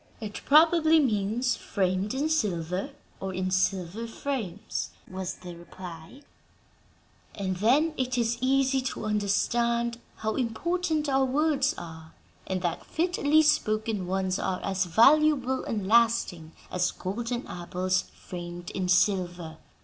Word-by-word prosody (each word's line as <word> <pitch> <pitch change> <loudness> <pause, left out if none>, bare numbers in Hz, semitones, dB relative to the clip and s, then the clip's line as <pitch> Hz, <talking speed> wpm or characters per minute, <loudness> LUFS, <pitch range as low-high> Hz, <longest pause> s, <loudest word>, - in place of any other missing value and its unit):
"It 210 -2 -6
probably 320 +1 +6
means 235 -1 +1
'framed 190 +3 -1
in 285 +3 0
silver' 190 - -1 0.3
or 190 -1 -4
'in 185 0 -1
silver 185 +3 0
frames,'" 225 -6 -4 0.2
was 185 -1 -5
the 175 -1 -10
reply; 175 - -11 1.1
"and 190 -2 -2
then 275 - +3
it 255 -1 -1
is 235 0 0
easy 270 0 +2
to 255 -3 -4
understand 235 +3 0 0.2
how 220 0 -3
important 310 +6 -1
our 270 -1 +3
words 285 +2 +1
are, 160 -1 -10 0.3
and 185 -1 -2
that 175 - -2
'fitly 315 -3 +2
spoken' 215 -8 +1
ones 190 0 -1
are 185 -1 -1
as 190 -1 0
valuable 265 - +4
and 210 -4 -2
lasting 215 -8 +2 0.2
as 180 0 +1
golden 235 +6 -4
apples 180 +1 -2
framed 175 -1 -8
in 185 -1 -2
silver. 180 -3 +1
215 Hz, 125 wpm, -27 LUFS, 185-265 Hz, 1.1 s, probably